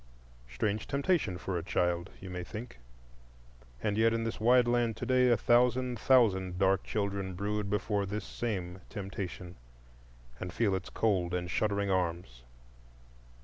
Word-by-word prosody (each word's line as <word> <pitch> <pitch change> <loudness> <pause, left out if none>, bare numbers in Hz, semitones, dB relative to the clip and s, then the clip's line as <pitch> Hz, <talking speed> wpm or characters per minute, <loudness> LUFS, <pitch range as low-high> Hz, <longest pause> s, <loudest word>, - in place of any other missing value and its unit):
Strange 100 - -2
temptation 140 - +1
for 90 -1 -3
a - - -7
child, 85 +1 0
you 95 - -9
may 90 -1 -5
think; 105 - -8 1.0
and 105 +1 0
yet 115 0 +4
in 115 - -1
this 115 - -3
wide 120 +2 +5
land 120 -2 +1
to - - -4
day 130 -1 +4
a 120 - +4
thousand 125 +1 +2
thousand 95 -9 +3
dark 95 +1 +2
children 100 -3 -2
brood 105 +2 -2
before 105 0 0
this 105 +2 -4
same 95 -6 -4
temptation, 95 -3 -6 0.8
and 90 - -5
feel 105 +1 +1
its 95 -1 -3
cold 90 -5 0
and 90 -1 -3
shuddering 100 -2 0
arms. 85 -9 -2
100 Hz, 145 wpm, -31 LUFS, 90-115 Hz, 1.0 s, wide